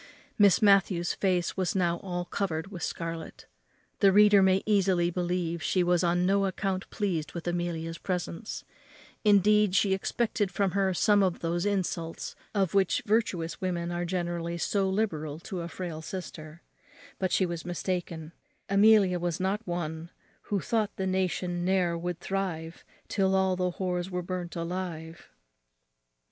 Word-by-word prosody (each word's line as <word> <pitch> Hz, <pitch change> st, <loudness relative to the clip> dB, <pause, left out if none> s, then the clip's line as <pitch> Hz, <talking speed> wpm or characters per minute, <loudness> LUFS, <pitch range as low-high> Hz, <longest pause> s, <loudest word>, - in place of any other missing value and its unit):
Miss 200 Hz, 0 st, +5 dB
Matthews's 195 Hz, -4 st, +4 dB
face 180 Hz, -3 st, 0 dB
was 185 Hz, -1 st, -1 dB
now 175 Hz, -2 st, +1 dB
all 175 Hz, -1 st, -4 dB
covered 175 Hz, -1 st, -3 dB
with 180 Hz, -4 st, -7 dB
scarlet. 165 Hz, -1 st, -5 dB, 0.5 s
The 195 Hz, -, +6 dB
reader 205 Hz, 0 st, +6 dB
may 190 Hz, 0 st, +3 dB
easily 190 Hz, -4 st, +2 dB
believe 175 Hz, -1 st, -2 dB
she 185 Hz, +2 st, +1 dB
was 175 Hz, 0 st, +2 dB
on 175 Hz, +1 st, +2 dB
no 195 Hz, +1 st, +3 dB
account 190 Hz, 0 st, -3 dB
pleased 175 Hz, -8 st, -2 dB
with 170 Hz, 0 st, -6 dB
Amelia's 170 Hz, -1 st, -2 dB
presence; 180 Hz, +3 st, -4 dB, 0.6 s
indeed, 210 Hz, -1 st, +4 dB
she 195 Hz, -2 st, +3 dB
expected 205 Hz, +1 st, -1 dB
from 195 Hz, +1 st, 0 dB
her 195 Hz, 0 st, +1 dB
some 205 Hz, +2 st, +4 dB
of 185 Hz, -3 st, 0 dB
those 170 Hz, +3 st, -1 dB
insults 180 Hz, -4 st, -2 dB, 0.2 s
of 195 Hz, -4 st, +1 dB
which 195 Hz, -2 st, +2 dB
virtuous 200 Hz, -6 st, 0 dB
women 175 Hz, -2 st, -2 dB
are 175 Hz, 0 st, -2 dB
generally 175 Hz, -1 st, -2 dB
so 195 Hz, +3 st, 0 dB
liberal 160 Hz, -8 st, -1 dB
to 180 Hz, 0 st, -5 dB
a 170 Hz, -, -4 dB
frail 170 Hz, -2 st, -6 dB
sister: 160 Hz, -2 st, -8 dB, 0.6 s
but 185 Hz, -1 st, 0 dB
she 190 Hz, -, +3 dB
was 170 Hz, -2 st, -4 dB
mistaken; 175 Hz, -1 st, -4 dB, 0.4 s
Amelia 200 Hz, -3 st, +5 dB
was 175 Hz, -2 st, -2 dB
not 190 Hz, +3 st, 0 dB
one 165 Hz, -1 st, -4 dB, 0.4 s
Who 200 Hz, -3 st, 0 dB
thought 220 Hz, -4 st, -1 dB
the 190 Hz, -, -2 dB
nation 180 Hz, -1 st, -1 dB
ne'er 180 Hz, -2 st, +2 dB
would 175 Hz, 0 st, -4 dB
thrive, 180 Hz, -4 st, -4 dB, 0.2 s
Till 190 Hz, -2 st, +1 dB
all 190 Hz, -1 st, +2 dB
the 180 Hz, -1 st, -1 dB
whores 180 Hz, -1 st, -2 dB
were 180 Hz, -1 st, -3 dB
burnt 180 Hz, -1 st, -5 dB
alive. 170 Hz, -1 st, -5 dB
180 Hz, 150 wpm, -28 LUFS, 170-195 Hz, 0.6 s, The